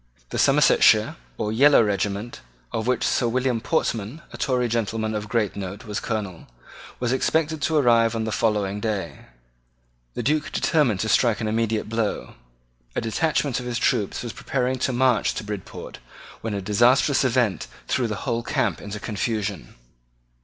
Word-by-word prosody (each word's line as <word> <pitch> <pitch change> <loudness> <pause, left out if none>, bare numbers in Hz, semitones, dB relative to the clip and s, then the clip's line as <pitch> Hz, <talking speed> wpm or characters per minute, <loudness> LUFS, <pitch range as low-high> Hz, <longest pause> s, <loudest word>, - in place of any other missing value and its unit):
The - - -2
Somersetshire, - - +4 0.2
or 105 - -2
yellow 140 +1 +6
regiment, 100 +2 -2 0.3
of 110 +1 -3
which 125 -1 +1
Sir 120 - +1
William 125 -1 0
Portman, 120 0 -2
a - - -7
Tory 125 -3 +1
gentleman 110 -1 -1
of 105 -1 -4
great 105 -3 0
note, 100 +3 -6
was 105 0 -3
Colonel, 100 -7 -4 0.5
was 120 -1 -1
expected 160 +3 0
to 160 - 0
arrive 115 -4 +4
on 115 - -1
the 110 - -3
following 105 -3 0
day. 105 -2 -4 0.9
The - - -3
Duke 150 +1 0
determined 135 - +1
to 110 - -1
strike 110 +3 +3
an 110 - -2
immediate 110 0 0
blow. 115 -1 -2 0.6
A - - 0
detachment 140 +3 0
of 125 - -6
his 120 -1 -2
troops 100 -1 0
was 120 - -5
preparing 130 -1 -2
to 130 - 0
march 125 -3 +2
to - - -4
Bridport 105 -2 -7 0.4
when 110 -2 -3
a 100 - -3
disastrous 120 +8 +3
event 120 -8 +1 0.2
threw 130 -2 0
the 105 -2 -5
whole 120 -3 0
camp - - -1
into 105 +1 -6
confusion. 105 - -3
115 Hz, 160 wpm, -24 LUFS, 105-125 Hz, 0.9 s, yellow